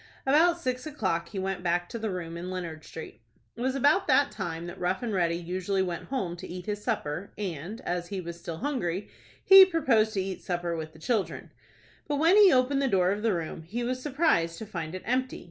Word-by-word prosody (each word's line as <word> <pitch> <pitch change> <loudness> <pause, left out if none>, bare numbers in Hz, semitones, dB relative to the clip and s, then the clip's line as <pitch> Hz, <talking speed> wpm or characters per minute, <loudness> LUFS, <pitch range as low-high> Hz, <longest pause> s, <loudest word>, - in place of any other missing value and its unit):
About 330 +6 +4
six 255 -1 -3
o'clock 185 - -2
he 205 - -7
went 190 -1 -2
back 175 0 0
to 230 - -5
the 220 0 -2
room 170 -3 -5
in 175 +2 -5
Leonard 170 -4 -5
Street. 160 -6 -9 0.3
It 235 - -8
was 260 +1 0
about 290 +8 +3
that 280 0 +4
time 170 -4 -4
that 175 +2 -8
Rough 180 +4 -1
and 230 -3 -2
Ready 170 -3 +1
usually 185 +3 -1
went 175 -2 -4
home 195 -11 -3
to 185 - -8
eat 180 0 -7
his 210 0 -4
supper, 195 -5 -2
and, 190 +2 -5
as 175 -1 -3
he 195 +1 -4
was 170 -1 -7
still 170 -1 -6
hungry, 195 - -2 0.4
he 385 0 +11
proposed 260 - +2
to 195 - +1
eat 190 -1 -5
supper 175 -1 -2
with 160 -1 -6
the - - -15
children. 205 +5 -2 0.6
But 295 - 0
when 325 +6 +4
he 415 -2 +8
opened 265 +2 +3
the 275 - +2
door 185 -5 +3
of 205 +1 -2
the 220 -3 +2
room, 165 -1 -4
he 215 +10 -4
was 255 +1 -2
surprised 265 - +1
to 220 - -6
find 170 -5 -5
it 185 - -7
empty. 255 +1 -1
195 Hz, 225 wpm, -28 LUFS, 175-255 Hz, 0.6 s, he